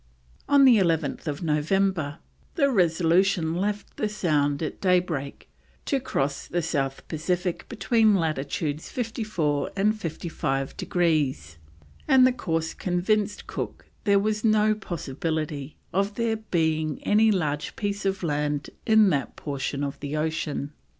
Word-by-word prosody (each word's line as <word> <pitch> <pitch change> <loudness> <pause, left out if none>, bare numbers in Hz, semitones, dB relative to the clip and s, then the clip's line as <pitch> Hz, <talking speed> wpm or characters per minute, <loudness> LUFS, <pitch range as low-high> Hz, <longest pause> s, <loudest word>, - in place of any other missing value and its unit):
On 280 -1 +6
11th 165 - +2
November 160 0 +1 0.4
the 280 -5 +3
Resolution 175 -2 +2
left 200 +3 -3
the 215 - 0
Sound 150 -7 0
at 155 - -5
daybreak 175 -7 0 0.4
to 275 - +1
cross 140 - -2
the 175 0 -1
South 135 -4 -2
Pacific 175 +3 -2
between 225 -3 +3
latitudes 155 -2 -2
54 215 - -1
and 210 +2 +2
55 155 -7 -3
degrees, 145 - 0 0.5
and 260 -1 +6
the 255 - +4
course 165 -8 -2
convinced 200 +3 0
Cook - - -6 0.2
there 200 -1 +5
was 210 +1 0
no 215 -1 +4
possibility 155 -5 -4 0.2
of 200 +2 0
there 230 -1 0
being 160 -7 -1
any 220 +1 +4
large 150 -7 -1
piece 205 -1 -3
of 195 -1 -1
land 150 -2 -1 0.2
in 220 -3 +6
that 140 -4 -1
portion 140 -1 -3
of 140 0 -4
the 145 +1 -3
ocean. 150 -2 -2
170 Hz, 125 wpm, -26 LUFS, 150-205 Hz, 0.5 s, On